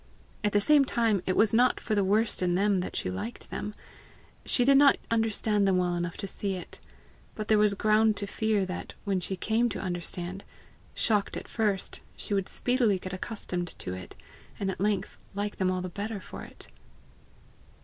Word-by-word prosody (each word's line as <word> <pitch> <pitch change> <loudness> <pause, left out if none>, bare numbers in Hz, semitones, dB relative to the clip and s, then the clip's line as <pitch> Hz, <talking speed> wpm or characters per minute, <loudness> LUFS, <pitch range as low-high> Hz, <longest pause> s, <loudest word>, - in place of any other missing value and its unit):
At 210 - +2
the 205 - +4
same 290 +7 +6
time, 225 -6 +1
it 185 - +1
was 215 -1 +4
not 245 +2 +4
for 220 - -3
the 205 -2 +3
worst 210 +3 +2
in 175 -1 +2
them 200 0 +2
that 180 - -4
she 90 - -1
liked 225 - -6
them; 210 - -4 0.7
she 245 - +3
did 275 +1 +6
not 280 0 +6
understand 215 -2 +2
them 190 -1 +3
well 180 -1 +1
enough 175 0 -3
to 195 - -4
see 195 0 -3
it. 180 - -9 0.6
But 215 -1 -5
there 215 -1 +5
was 210 -1 +4
ground 215 +1 +3
to 200 - 0
fear 210 -1 0
that, 185 0 -6
when 195 -2 +1
she 185 +2 -2
came 225 +6 +1
to 205 - -4
understand, 180 +1 -4 0.5
shocked 210 -3 +1
at - - -7
first, 210 -4 0 0.2
she - - -3
would 195 -2 0
speedily 245 -5 +2
get 185 0 -7
accustomed 185 -3 -4
to 90 - -4
it, 95 -1 -8 0.4
and 195 -1 0
at 185 - -7
length 205 -1 -1 0.2
like 205 +1 -3
them 185 -1 +1
all 185 0 -1
the 185 - -3
better 205 +3 -4
for - - -9
it. - - -6
200 Hz, 195 wpm, -28 LUFS, 185-220 Hz, 0.7 s, same